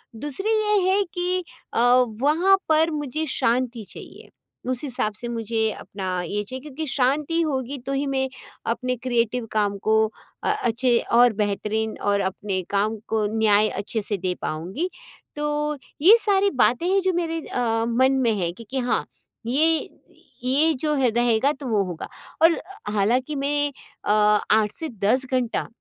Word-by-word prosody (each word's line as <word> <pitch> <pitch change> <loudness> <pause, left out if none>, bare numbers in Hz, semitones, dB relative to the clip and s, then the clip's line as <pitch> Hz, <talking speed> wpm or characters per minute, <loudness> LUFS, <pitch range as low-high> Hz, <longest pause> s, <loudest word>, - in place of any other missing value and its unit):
दूसरी 295 - -3
ये 425 -2 +3
है 400 +2 +3
कि 360 +1 0 0.3
अ, - - 0 0.4
वहाँ 340 +7 +4
पर 320 +1 +4
मुझे 300 +1 -3
शांति 240 -1 0
चाहिए। - - -12 0.4
उस 255 +1 -2
हिसाब 245 -6 -1
से 240 +3 -7
मुझे 225 -1 -1
अपना 185 -2 -4
ये 205 +4 -2
चाहिए 260 +5 -8
क्योंकि 300 +2 -6
शांति 285 +5 +1
होगी 275 -3 -2
तो 275 - -2
ही 275 +1 0
मैं 265 -1 0 0.4
अपने 250 +1 -3
क्रिएटिव 240 -1 0
काम 205 -2 0
को 220 0 +3 0.5
अ, - - 0
अच्छे 240 0 +2
और 240 0 +6
बेहतरीन 215 +1 -1
और 200 0 +1
अपने 190 0 -2
काम 210 +2 +1
को 220 -1 +1
न्याय 215 -1 +4
अच्छे 205 +3 -3
से 205 0 -2
दे 185 0 -2
पाऊँगी। 185 - -3 0.5
तो 295 0 -1 0.2
ये 385 +8 +9
सारी 400 -1 +3
बातें 245 +7 +3
हैं 390 +1 +3
जो 375 0 +1
मेरे 330 -1 -1
अ, 225 -2 0
मन 260 +3 +3
में 230 - +3
है 170 -2 0
क्योंकि 235 +6 -5
हाँ, 245 0 0 0.4
ये 315 +5 +2 0.5
ये 295 +5 +3
जो 305 -1 +1
है 265 -3 +3
रहेगा 240 +3 +2
तो 270 - -6
वो 210 -3 +2
होगा। 175 -3 -6 0.4
और 330 0 +5 0.3
हालाँकि 250 +8 +1
मैं 290 +1 0 0.3
अ, - - +1 0.4
8 215 -1 +3
से 320 - -3
10 255 +6 +3
घंटा, 250 -3 0
250 Hz, 160 wpm, -23 LUFS, 220-300 Hz, 0.5 s, ये